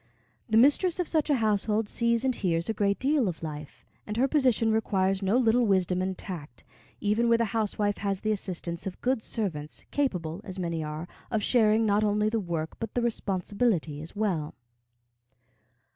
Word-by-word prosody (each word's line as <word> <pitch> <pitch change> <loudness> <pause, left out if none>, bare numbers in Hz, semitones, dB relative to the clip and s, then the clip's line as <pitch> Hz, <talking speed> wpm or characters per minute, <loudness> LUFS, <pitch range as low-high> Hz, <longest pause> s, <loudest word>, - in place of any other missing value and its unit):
The 220 - +3
mistress 295 +9 +4
of 355 - 0
such 310 -2 +1
a 290 - +4
household 215 -1 +1
sees 235 +2 +1
and 260 - +2
hears 170 -6 -1
a 225 - 0
great 200 -1 +1
deal 275 -3 +2
of 170 -1 -7
life; 150 -2 -7 0.2
and 210 +1 -4
her 260 +3 +3
position 255 -6 +2
requires 195 -3 +1
no 195 +5 +2
little 240 -1 +3
wisdom 185 -2 +2
and 185 0 -2
tact, 165 -6 -8 0.4
even 215 +3 +1
where 230 - +5
the 230 - +1
housewife 210 -2 0
has 195 -2 -2
the 215 - 0
assistance 180 -4 -3
of 185 - -6
good 255 -2 +1
servants, 160 -11 -4
capable, 180 - -1
as 190 -1 -7
many 170 -3 -2
are, 155 +2 -5 0.2
of 220 -3 -1
sharing 220 -2 +4
not 210 0 +2
only 210 0 +2
the 225 +1 0
work, 165 -5 -4
but 225 -2 -5
the 245 - +1
responsibility 195 -7 -1
as 160 +5 -9
well. 185 -8 -1
210 Hz, 180 wpm, -28 LUFS, 180-230 Hz, 0.4 s, where